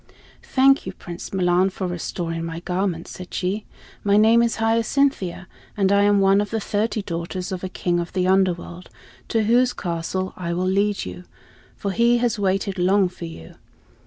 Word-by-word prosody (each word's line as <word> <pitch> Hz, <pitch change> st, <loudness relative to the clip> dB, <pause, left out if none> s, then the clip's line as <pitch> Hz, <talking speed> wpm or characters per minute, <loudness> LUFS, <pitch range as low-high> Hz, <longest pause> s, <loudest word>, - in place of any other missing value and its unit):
"Thank 270 Hz, -4 st, +3 dB
you, 190 Hz, -, -4 dB
Prince 175 Hz, -1 st, -8 dB
Milan, 180 Hz, 0 st, +2 dB
for 190 Hz, 0 st, -5 dB
restoring 170 Hz, -1 st, -3 dB
my 165 Hz, 0 st, -5 dB
garment," 180 Hz, -1 st, -2 dB
said 180 Hz, -1 st, -9 dB
she. 195 Hz, +4 st, -2 dB, 0.4 s
"My 200 Hz, 0 st, +3 dB
name 225 Hz, +2 st, +6 dB
is 235 Hz, -1 st, +1 dB
Hyacinthia, 225 Hz, -4 st, 0 dB, 0.3 s
and 195 Hz, -1 st, +2 dB
I 200 Hz, 0 st, +4 dB
am 205 Hz, 0 st, +4 dB
one 195 Hz, +1 st, +4 dB
of 205 Hz, -, -3 dB
the 225 Hz, -, -1 dB
thirty 215 Hz, +1 st, -1 dB
daughters 180 Hz, +1 st, -4 dB
of 185 Hz, -1 st, -4 dB
a 185 Hz, -, -3 dB
King 175 Hz, -1 st, -1 dB
of 170 Hz, 0 st, -4 dB
the 180 Hz, -1 st, +1 dB
Underworld, 185 Hz, -2 st, 0 dB, 0.4 s
to 225 Hz, -1 st, +1 dB
whose 245 Hz, +3 st, +3 dB
castle 180 Hz, +2 st, -3 dB
I 170 Hz, -1 st, -3 dB
will 180 Hz, +2 st, -1 dB
lead 200 Hz, +2 st, +1 dB
you, 90 Hz, 0 st, -8 dB, 0.5 s
for 200 Hz, -, -3 dB
he 235 Hz, +3 st, +3 dB
has 235 Hz, -3 st, 0 dB
waited 195 Hz, 0 st, 0 dB
long 190 Hz, +1 st, +3 dB
for 175 Hz, -1 st, -9 dB
you. 80 Hz, -, -11 dB
190 Hz, 180 wpm, -22 LUFS, 175-210 Hz, 0.5 s, name